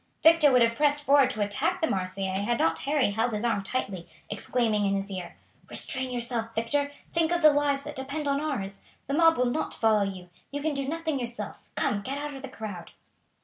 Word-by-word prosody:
Victor 320 -3 +7
would 250 -2 +6
have 230 0 +2
pressed 290 +1 +2
forward 280 -2 +5
to 210 - -1
attack 275 - -1
the 325 - +2
Marseillais 190 -3 -2
had 235 +3 0
not 165 -4 +1
Harry 280 -6 +1
held 225 +3 0
his 210 +1 -2
arm 225 -4 +1
tightly, 195 -4 -3 0.2
exclaiming 215 0 0
in 195 - +1
his 195 +1 -3
ear: 185 -2 -6 0.3
"Restrain 260 0 0
yourself, 235 -2 -3
Victor. 285 +6 0 0.2
Think 335 -1 +2
of 345 -1 0
the 305 -1 +8
lives 285 -1 +1
that 300 - -7
depend 275 +3 -4
upon 280 0 +1
ours. 200 -11 -3 0.2
The 275 - -3
mob 325 +1 +5
will 250 - +2
not 250 +6 -1
follow 220 -2 +3
you. 190 -3 -4 0.2
You 285 - -4
can 315 -1 0
do 275 -1 -2
nothing 320 -3 -2
yourself. 235 -4 -5
Come, 205 - 0
get 270 +6 -4
out 295 0 -4
of 270 - -8
the 270 - -7
crowd." 210 -8 -7
250 Hz, 215 wpm, -27 LUFS, 205-290 Hz, 0.3 s, the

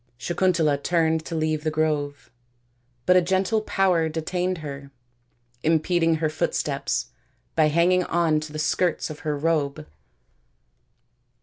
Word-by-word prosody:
Sakuntala 165 -2 +1
turned 160 -1 +1
to 165 - -5
leave 155 -1 -1
the 155 - +1
grove, 150 -2 -2 0.7
but 180 - +5
a 185 - +6
gentle 190 +5 +1
power 185 -6 +1
detained 180 +3 -2
her, 140 -1 -7 0.7
impeding 165 +2 +2
her 160 0 0
footsteps 155 0 -2 0.4
by 155 -2 +4
hanging 175 +4 +3
on 165 -3 +2
to 155 0 -8
the 155 - -6
skirts 160 +2 0
of 150 - -9
her 150 -2 -2
robe. 145 - -1
160 Hz, 125 wpm, -24 LUFS, 155-175 Hz, 0.7 s, a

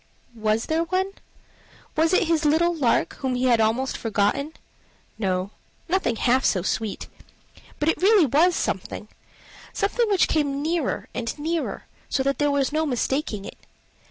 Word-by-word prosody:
Was 220 0 0
there 325 +1 0
one? 375 +3 -1 0.8
was 320 +2 +3
it 370 - +4
his 325 -1 +1
little 325 +3 +3
lark, 270 -8 +1
whom 260 -2 -2
he 250 - -1
had 235 -3 +4
almost 235 +5 +1
forgotten? 225 +8 0 0.7
No, 185 -1 -1 0.4
nothing 360 -9 +1
half 250 +4 +2
so 185 -4 +2
sweet. 215 +1 -2 0.7
But 295 - -1
it 325 - +1
really 400 -3 +6
was 320 +7 +3
something 210 +2 -3 0.6
something 450 +3 0
which 395 -3 +3
came 285 -2 0
nearer 325 -2 -1
and 235 +1 -3
nearer, 320 +2 -3 0.2
so 265 - 0
that 275 +1 0
there 290 0 +2
was 280 -1 +1
no 315 0 +1
mistaking 250 -5 -1
it. - - -10
280 Hz, 155 wpm, -24 LUFS, 230-325 Hz, 0.8 s, really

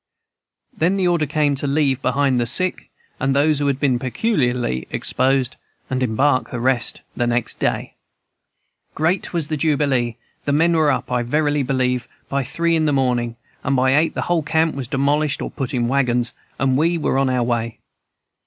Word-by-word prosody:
"Then 180 +5 +1
the 185 -2 +2
order 170 -4 +1
came 150 -1 +1
to 140 +1 -2
leave 140 -2 +1
behind 130 -1 +1
the 120 - 0
sick 185 +9 0 0.3
and 135 +1 +1
those 145 +1 +3
who 145 - 0
had 140 -1 0
been 130 -4 +2
peculiarly 125 - -1
exposed, 130 -1 0 0.3
and 130 0 -1
embark 130 +3 +1
the 125 - -4
rest 125 -1 +1
next 120 -1 0
day. - - -1 1.0
"Great 170 +5 0
was 165 -4 -1
the 155 - -1
jubilee! 140 -6 +1 0.3
The 145 - +1
men 165 +3 +3
were 155 -3 +3
up, 130 - -3
I 125 -1 +1
verily 145 +4 +1
believe, 125 -2 0 0.2
by 140 0 0
three 170 +6 0
in 160 -1 +1
the 150 - +2
morning, 125 -3 0 0.3
and 140 0 +1
by 130 0 +3
eight 160 +2 +2
the - - -1
whole 175 -2 +1
camp 160 +1 +1
was 130 -3 -5
demolished 140 +3 +1
or - - -4
put 135 -3 -4
in 120 -3 0
wagons, 125 -2 +1 0.2
and 130 -1 +1
we 170 +2 +2
were 140 -4 0
on 135 -1 +2
our 125 -1 +1
way. 115 -1 -2
135 Hz, 180 wpm, -20 LUFS, 125-150 Hz, 1.0 s, those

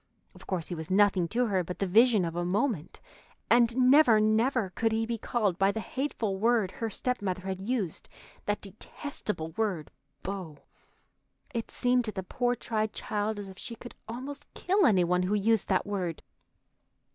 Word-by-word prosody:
Of - - -15
course 180 -4 -2
he - - -3
was 160 0 -6
nothing 190 -2 +4
to 245 +7 +1
her 190 -5 +1
but 180 +1 -6
the 195 - 0
vision 215 0 +5
of 165 0 -4
a 175 - -1
moment, 190 - -1 0.5
and 235 0 +5
never, 255 -3 +6
never, 215 0 +2
could 225 +3 0
he 225 +1 +1
be 230 0 -3
called 205 -7 0
by 195 +1 +4
the 220 - -4
hateful 220 -3 -2
word 220 -2 +2
her 225 - -3
stepmother 200 -5 -2
had 190 -1 -3
used, 205 -5 -2 0.4
that 205 0 0
detestable 205 - -5
word 185 -5 -2 0.3
"beau." 185 -6 -5 1.0
It 230 -2 -3
seemed 245 -1 +2
to 215 - -3
the 190 -2 -5
poor, 245 +6 0
tried 220 -2 -2
child 210 +1 -2
as 205 -1 -6
if 190 0 -11
she 235 - -6
could 245 - -11
almost 275 +5 -7
kill 390 +2 +3
any 190 -5 +4
one 180 +1 +2
who 185 +3 +1
used 215 +1 +2
that 185 - +1
word. 185 -5 -3
210 Hz, 180 wpm, -29 LUFS, 185-235 Hz, 1.0 s, never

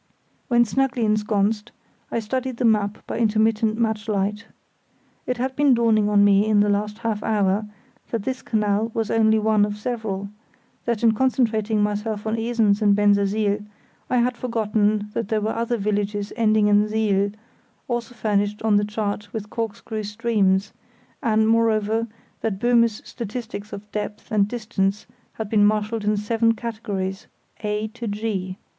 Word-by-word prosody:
When 240 -1 +4
snugly 255 0 0
ensconced, 210 +1 0 0.4
I - - -1
studied 255 +2 -3
the 245 - 0
map 210 -2 +1
by - - -4
intermittent 220 0 +2
match 220 -1 -1
light. 205 +1 -1 0.8
It 250 - -1
had 260 +2 -2
been 280 -2 +4
dawning 220 -3 +3
on 205 -1 +5
me 200 +1 +4
in 215 -1 +4
the 205 - +2
last 210 +1 -1
half 225 -3 -2
hour 205 -1 +1 0.4
that 230 -4 -2
this 260 +2 -3
canal 210 0 0
was 225 -1 -1
only 220 -1 +4
one 215 -1 +3
of 205 0 -1
several; 210 -4 -3 0.6
that 235 -2 -1
in 230 - +6
concentrating 220 -3 +1
myself 210 +1 -2
on 220 0 0
Esens 225 -3 +2
and 205 -1 +4
Bensersiel, 205 0 +2 0.5
I 250 - +2
had 245 +1 +2
forgotten 215 -3 0
that 230 - -2
there 220 0 +1
were 215 +1 -1
other 235 +1 -1
villages 205 0 -2
ending 215 -2 +3
in 210 +1 +4
siel, 205 -2 +1 0.6
also 240 0 -3
furnished 205 -2 0
on 215 -2 +4
the 205 - +2
chart 210 -1 -3
with 215 -2 -6
corkscrew 220 -1 -4
streams; 210 -2 +1 0.5
and, 220 -3 +2
moreover, 225 0 +2 0.3
that 220 -4 -2
Böhme's 235 -1 +2
statistics 225 -2 -6
of 210 +1 -9
depth 210 +2 -5
and 205 -2 +3
distance 210 -3 -2 0.3
had 220 - -5
been 210 0 +3
marshalled 215 +1 +1
in 210 0 +2
seven 230 +2 +1
categories, 205 -4 -4 0.3
A 210 0 -2
to 235 +1 -7
G. 205 -3 -3
215 Hz, 155 wpm, -23 LUFS, 205-230 Hz, 0.8 s, in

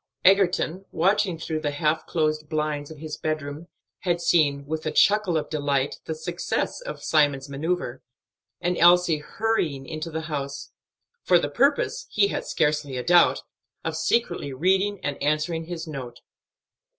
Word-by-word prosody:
Egerton, 190 -1 +3
watching 190 0 +2
through 160 -1 -3
the 150 - -1
half 150 +2 0
closed 155 -2 -1
blinds 150 -2 -2
of 160 - -10
his 155 0 -6
bed 155 0 -1
room, 145 +4 -7 0.3
had 175 -2 0
seen, 145 -5 +2
with 155 +2 -4
a - - 0
chuckle 200 -3 +3
of 155 - -2
delight, 145 -2 -1
the 160 - -3
success 175 - -3
of - - -7
Simon's 145 -3 +2
manoeuvre, 140 -2 -2 0.6
and 175 0 0
Elsie 175 -2 +5
hurrying 155 -6 -1
into 155 +1 -5
the 160 0 -3
house; 140 -3 -5 0.5
for - - +4
the - - -1
purpose - - +1
he 200 -1 +3
had - - -4
scarcely 150 -3 0
a 125 - -3
doubt 175 +3 +4 0.4
of - - -2
secretly 175 -11 0
reading 190 +8 +1
and 145 -1 -3
answering 155 +3 0
his 170 -1 -5
note. 130 -6 -7
155 Hz, 155 wpm, -25 LUFS, 145-175 Hz, 0.6 s, Elsie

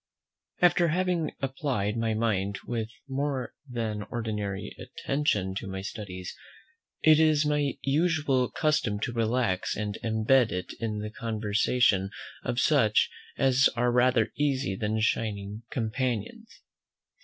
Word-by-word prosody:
After 175 0 +5
having 175 -1 0
applied 130 -7 -1
my 115 -1 0
mind 100 -3 0
with 115 -2 -3 0.2
more 135 -1 -2 0.2
than 110 -4 -2
ordinary 105 -4 -3
attention 105 -10 -1
to - - -8
my 95 0 -4
studies, 95 -4 -6 0.7
it 155 -1 +7
is 155 -1 +4
my 150 -2 0
usual 145 -4 +2
custom 135 -9 +1
to 120 - -2
relax 115 -4 0
and 105 0 -3
unbend 115 +2 +3
it 90 -1 -4
in 110 -2 -2
the 105 0 -5
conversation 110 -2 +1 0.3
of 120 - -1
such 130 -7 +3 0.3
as 135 0 +4
are 120 +1 +2
rather 125 -2 +3
easy 135 -7 +1
than 110 +2 -1
shining 105 -2 -1
companions. 125 - -3
115 Hz, 120 wpm, -28 LUFS, 105-140 Hz, 0.7 s, it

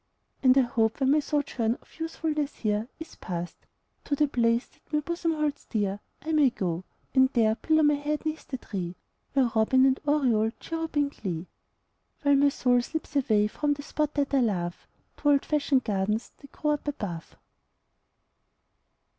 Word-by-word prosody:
And 255 0 +5
I - - +8
hope 230 -2 0
when 265 0 +3
my 305 - +5
sojourn 280 -6 0
of - - -23
usefulness 315 -3 -2
here 215 0 -1
Is 320 - -9
past, 175 -1 -5 0.5
to 285 - 0
the 295 +1 +3
place 235 -2 +2
that - - -30
my 300 - +2
bosom 335 +2 -1
holds 300 -2 -2
dear 205 -3 -1 0.2
I 320 - -3
may 300 -4 +5
go, 180 -5 -3 0.3
and 260 -1 +5
there 220 -3 +4
pillow 315 +6 +2
my 295 0 +5
head 295 +2 -2
'neath 310 0 -3
the 260 - -4
tree 185 -7 -5 0.4
Where 260 -4 +3
robin 260 +4 +4
and 265 0 +3
oriole 245 -7 +2
chirrup 325 -2 -4
in 290 -1 +3
glee, 180 - -5 0.8
While 285 -1 +5
my 285 +1 +5
soul 250 -3 +2
slips 315 +3 -6
away 220 -7 +3
from 290 +7 0
the 285 - -8
spot 300 0 -2
that 285 -1 0
I 275 - +5
love, 180 -8 -1 0.3
To 290 - +1
old 280 -1 +4
fashioned 280 -3 +2
gardens 210 +1 -1
that 280 - -15
grow 300 - -1
up 295 0 -2
above. 200 - -5
270 Hz, 175 wpm, -27 LUFS, 220-295 Hz, 0.8 s, I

